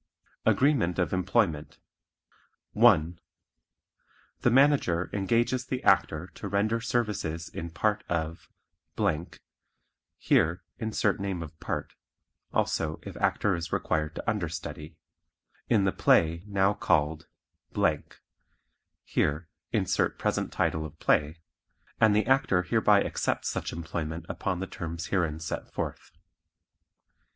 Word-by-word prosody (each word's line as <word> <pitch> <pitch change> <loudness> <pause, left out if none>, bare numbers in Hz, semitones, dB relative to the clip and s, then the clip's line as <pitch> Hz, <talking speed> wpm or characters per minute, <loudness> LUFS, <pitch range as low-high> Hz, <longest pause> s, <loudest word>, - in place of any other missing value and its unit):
Agreement 130 - +3
of 90 -3 0
Employment 90 -5 0 0.9
1. 85 +2 +4 1.2
The - - +3
Manager 130 - +3
engages 115 +6 +1
the 130 0 -4
Actor 80 +4 +2
to - - -7
render 105 +4 +1
services 105 -9 -2
in 85 +1 -6
part 105 +5 0
of 80 -1 -3 1.7
(Here 85 +2 +2 0.2
insert 110 -2 0
name 95 -3 -3
of 80 0 -12
part; - - -4 0.6
also 80 -1 0
if - - -8
Actor 105 - +1
is 85 0 -5
required 75 0 -1
to - - -7
understudy) 80 -6 -4 0.7
in 110 -4 +4
the 95 - +2
play 85 -1 +3
now 100 0 +2
called 80 -4 0 1.8
(Here 75 +3 0 0.2
insert 100 -5 +1
present - - -1
title 80 - 0
of 80 0 -9
play) 80 +2 +1 0.6
and 110 -2 +5
the 105 - +3
Actor 130 -9 +3
hereby - - +4
accepts - - -1
such - - -3
employment 80 0 -4
upon 95 -2 -3
the - - -1
terms 85 -3 -6
herein 80 -5 0
set 80 - -5
forth. - - -5
85 Hz, 110 wpm, -28 LUFS, 80-105 Hz, 1.8 s, and